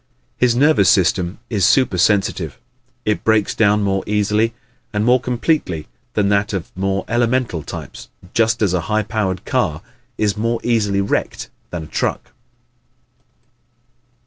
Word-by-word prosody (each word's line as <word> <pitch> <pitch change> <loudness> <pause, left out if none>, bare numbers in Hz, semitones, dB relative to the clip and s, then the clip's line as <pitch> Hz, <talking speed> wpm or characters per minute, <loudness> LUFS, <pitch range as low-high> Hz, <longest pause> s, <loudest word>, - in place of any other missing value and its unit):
His 125 -2 +2
nervous 130 - +4
system 90 0 +2
is 105 -5 -1
supersensitive. 95 - +2 0.5
It 105 - 0
breaks 110 -2 +2
down 105 -1 +3
more 95 -1 0
easily 105 +2 +1 0.4
and 105 0 0
more 125 +2 +5
completely 120 - -1 0.3
than 100 -2 +2
that 100 +1 +1
of 95 -4 -4
the - - -12
more 95 0 -1
elemental 120 -6 0
types, 70 - -9 0.2
just 110 -1 +2
as 95 -4 +2
a 90 - +1
high 110 0 +2
powered 95 -3 -2
car 75 +2 -1 0.3
is 105 -2 +1
more 115 +2 -1
easily 105 -5 +1
wrecked 100 - -2 0.2
than 85 -2 -5
a - - -8
truck. - - -3
105 Hz, 140 wpm, -19 LUFS, 95-115 Hz, 0.5 s, more